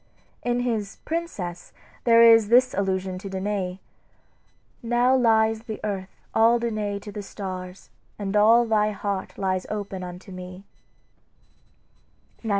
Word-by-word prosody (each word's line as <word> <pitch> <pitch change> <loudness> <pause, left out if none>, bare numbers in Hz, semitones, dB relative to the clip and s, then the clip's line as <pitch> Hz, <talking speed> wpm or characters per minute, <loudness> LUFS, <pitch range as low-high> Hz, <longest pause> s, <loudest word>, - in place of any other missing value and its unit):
In 245 0 0
his 220 -5 -2
"Princess" 210 - -4 0.3
there 230 -1 +7
is 225 -2 +7
this 255 +2 +5
allusion 190 -1 -1
to 195 - -7
Danae: 190 -1 -3 1.0
"Now 240 +2 +3
lies 225 -3 +3
the 220 -2 -7
earth 195 -3 -3 0.2
all 230 +2 +5
Danae 215 -3 -2
to 205 +1 -9
the 205 - -6
stars, 185 -2 -7 0.3
And 200 -1 -3
all 225 +3 +6
thy 215 -2 +2
heart 200 -1 -4
lies 185 -1 -1
open 200 -3 -4
unto 180 +2 -9
me." 185 +1 -9
205 Hz, 125 wpm, -25 LUFS, 190-230 Hz, 1.0 s, there